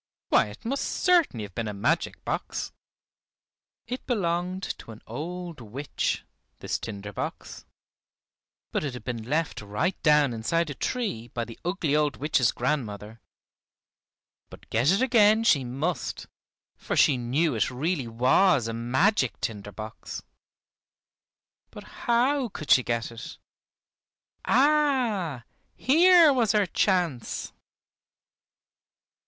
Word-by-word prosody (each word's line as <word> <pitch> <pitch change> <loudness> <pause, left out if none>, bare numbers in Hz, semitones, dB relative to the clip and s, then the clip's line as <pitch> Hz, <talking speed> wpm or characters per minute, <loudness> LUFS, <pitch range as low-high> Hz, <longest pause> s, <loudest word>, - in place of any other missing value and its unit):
Why, - - +4
it 105 - -12
must 275 +4 -1
certainly 340 - +2
have 100 -2 -9
been 115 +2 -3
a 105 - -4
magic 100 - -1
box! - - -3 1.1
It 250 +2 -6
belonged 185 -4 -1 0.2
to - - -13
an 110 -1 -11
old 170 +5 -6
witch, 125 +6 -3 0.3
this - - -3
tinder 105 -2 -7
box, - - -6 1.1
but - - -1
it 140 -4 -3
had 125 - -9
been 120 -3 -4
left 150 +6 -2
right 105 - -2
down 150 -4 +4
inside 155 +8 -1
a - - -3
tree 200 - -3
by 120 0 -4
the 115 - -11
ugly 175 -5 0
old 150 -2 +1
witch's 135 -5 +2
grandmother. 110 -5 -3 1.3
But - - -14
get 120 +6 +2
it 195 +7 +3
again 220 -3 +5
she 145 - +4
must, 140 +8 -3 0.5
for - - -3
she 145 - +5
knew 130 +6 0
it 110 -3 +1
really 140 +1 -2
was 125 - +3
a 115 - -3
magic 130 - +1
tinder 105 -2 -4
box. 110 +2 -8 1.5
But - - -11 0.2
how 250 +2 +2
could 155 -7 -5
she 125 - +7
get 120 -1 -2
it? 115 -1 -9 1.1
Ah! 250 - +2 0.3
here 335 +2 +6
was 230 -6 +2
her 210 -2 +3
chance. 175 - -1
150 Hz, 125 wpm, -26 LUFS, -, 1.5 s, she